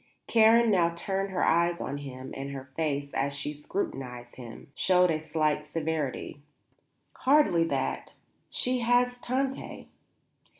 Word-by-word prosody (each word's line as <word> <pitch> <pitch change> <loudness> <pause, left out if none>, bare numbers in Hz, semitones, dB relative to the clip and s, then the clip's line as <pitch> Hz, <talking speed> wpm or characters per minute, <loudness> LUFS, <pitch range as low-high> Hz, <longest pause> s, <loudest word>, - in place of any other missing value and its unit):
Karen 230 0 +5
now 175 -4 +4
turned 195 +3 -2
her 190 - 0
eyes 170 +1 +2
on 145 - -4
him, 130 -2 -8
and 135 +1 -5
her 135 -1 -8
face, 145 -3 -1
as 140 +1 -1
she 145 +2 -4
scrutinized 130 -6 -5
him, 125 +4 -11
showed 180 +1 +3
a 155 - 0
slight 155 -1 0
severity. 150 -3 -3 0.8
"Hardly 260 - +4
that. - - -3 0.3
She 250 0 0
has 245 +1 +2
Tante." 265 +2 -3
160 Hz, 130 wpm, -28 LUFS, 140-210 Hz, 0.8 s, Karen